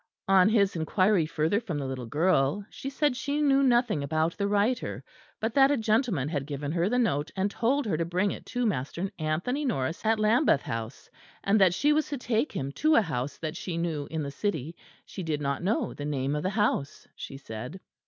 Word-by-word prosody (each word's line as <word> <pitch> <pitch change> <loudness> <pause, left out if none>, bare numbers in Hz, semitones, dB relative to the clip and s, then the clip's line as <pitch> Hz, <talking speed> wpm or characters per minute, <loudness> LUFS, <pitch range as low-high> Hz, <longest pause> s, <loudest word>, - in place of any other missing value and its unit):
On 190 0 +6
his 200 -4 +2
inquiry 180 +2 +2
further 165 +5 +1
from 185 -10 -4
the 140 - -3
little 130 -2 -5
girl, 155 - +1
she 270 - -6
said 285 -1 +1
she 280 +3 -2
knew 275 -2 +4
nothing 240 - +3
about 155 +3 0
the 200 - -1
writer; 210 +5 0 0.4
but 220 +1 -2
that 270 0 +6
a 290 - +2
gentleman 220 - +1
had 145 -3 -3
given 145 0 -4
her 170 +3 +1
the 245 - +1
note 150 - +1
and 195 +1 0
told 270 +7 +1
her 195 -7 0
to 165 - 0
bring 180 +4 0
it - - -7
to 245 -1 -1
Master 180 - -2
Anthony 170 - -1
Norris 165 - -2
at 225 0 +2
Lambeth 215 - +3
House; 115 +2 -5 0.4
and 200 +1 +3
that 180 -2 +5
she 295 +7 +3
was 310 0 +1
to 290 - -3
take 245 +2 0
him 135 0 -3
to 310 - +2
a - - +6
house 140 -5 -3
that 155 -2 -4
she 175 -3 -4
knew 160 -4 -2
in 160 -1 -3
the 140 - -4
city; 160 -2 -3 0.3
she 190 - -7
did 160 -4 -2
not 140 -1 -2
know 200 +6 0
the 145 - -7
name 140 -1 -1
of 150 - -1
the 185 - 0
house, 205 -9 -1
she 135 - -8
said. 125 +6 -7
185 Hz, 215 wpm, -28 LUFS, 150-225 Hz, 0.4 s, On